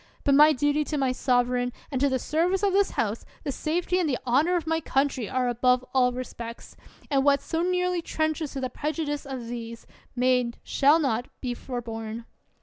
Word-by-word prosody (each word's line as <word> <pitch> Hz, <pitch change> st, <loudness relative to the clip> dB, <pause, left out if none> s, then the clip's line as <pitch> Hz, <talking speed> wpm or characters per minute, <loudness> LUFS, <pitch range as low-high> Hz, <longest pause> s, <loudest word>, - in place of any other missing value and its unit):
But 280 Hz, -, +3 dB
my 300 Hz, +2 st, +8 dB
duty 290 Hz, +2 st, +1 dB
to 300 Hz, -, -2 dB
my 265 Hz, -2 st, +1 dB
sovereign 245 Hz, -1 st, +1 dB, 0.2 s
and 265 Hz, -2 st, -2 dB
to 280 Hz, -, +4 dB
the 260 Hz, -, +1 dB
service 345 Hz, -, 0 dB
of 395 Hz, -2 st, +2 dB
this 400 Hz, 0 st, +3 dB
House, 220 Hz, 0 st, -2 dB, 0.2 s
the 280 Hz, -, -2 dB
safety 350 Hz, +6 st, -1 dB
and 340 Hz, -4 st, +1 dB
the 255 Hz, -, 0 dB
honor 285 Hz, +9 st, +3 dB
of 340 Hz, -3 st, -1 dB
my 325 Hz, 0 st, +1 dB
country, 270 Hz, -6 st, 0 dB
are 255 Hz, -1 st, 0 dB
above 250 Hz, +1 st, +2 dB
all 250 Hz, -2 st, +4 dB
respects; 240 Hz, -2 st, -7 dB, 0.4 s
and 270 Hz, -1 st, +3 dB
what 280 Hz, 0 st, +4 dB
so 325 Hz, -, -2 dB
nearly 360 Hz, 0 st, +1 dB
trenches 315 Hz, -2 st, -2 dB
to 275 Hz, -, -4 dB
the 255 Hz, -, -3 dB
prejudice 295 Hz, -1 st, -3 dB
of 260 Hz, -3 st, -5 dB
these, 230 Hz, -1 st, -7 dB, 0.3 s
may 250 Hz, 0 st, +3 dB
not, 235 Hz, -, -6 dB
shall 290 Hz, +3 st, +4 dB
not, 245 Hz, -6 st, 0 dB
be 250 Hz, -2 st, -3 dB
forborne. 230 Hz, -2 st, -6 dB
270 Hz, 195 wpm, -26 LUFS, 245-310 Hz, 0.4 s, my